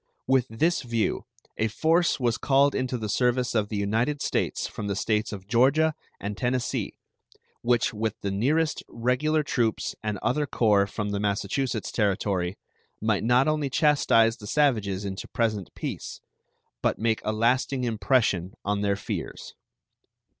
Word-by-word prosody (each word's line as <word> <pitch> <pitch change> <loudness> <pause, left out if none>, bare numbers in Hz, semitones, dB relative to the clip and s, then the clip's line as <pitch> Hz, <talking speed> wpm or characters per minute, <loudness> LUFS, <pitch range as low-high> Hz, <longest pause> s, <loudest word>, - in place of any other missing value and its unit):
With 130 -1 +2
this 160 +10 +1
view 115 -3 -1 0.3
a 110 - +2
force 160 +10 +2
was 120 -3 0
called 140 0 +3
into 130 -1 -1
the 110 -2 -4
service 125 +3 +1
of 105 -3 0
the 105 - -3
United 115 +8 0
States - - -1
from 105 - -5
the 100 - -1
States 105 +2 0
of 95 -2 -8
Georgia 140 +7 +3 0.3
and 100 +1 -4
Tennessee, 125 +2 -1 0.7
which, 120 -1 +2
with 110 0 -2
the 100 - -2
nearest 150 +11 +1
regular 135 +6 +1
troops 120 -6 0
and 105 -1 -2
other 145 +3 +1
corps 105 -6 +3
from 105 +1 -4
the 100 - -1
Massachussets 105 +5 -1
Territory, 100 -3 0 0.4
might 110 -1 0
not 125 +4 +4
only 155 -2 0
chastise 125 -6 +3
the 105 - -10
savages 105 -9 +1
into 95 0 -5
present 110 -6 -1
peace - - -5 0.6
but - - +1
make 110 -1 0
a 110 - 0
lasting 125 +4 +1
impression 110 -5 +1
on 100 0 0
their 100 -1 +1
fears. 100 - -6
115 Hz, 150 wpm, -26 LUFS, 105-130 Hz, 0.7 s, not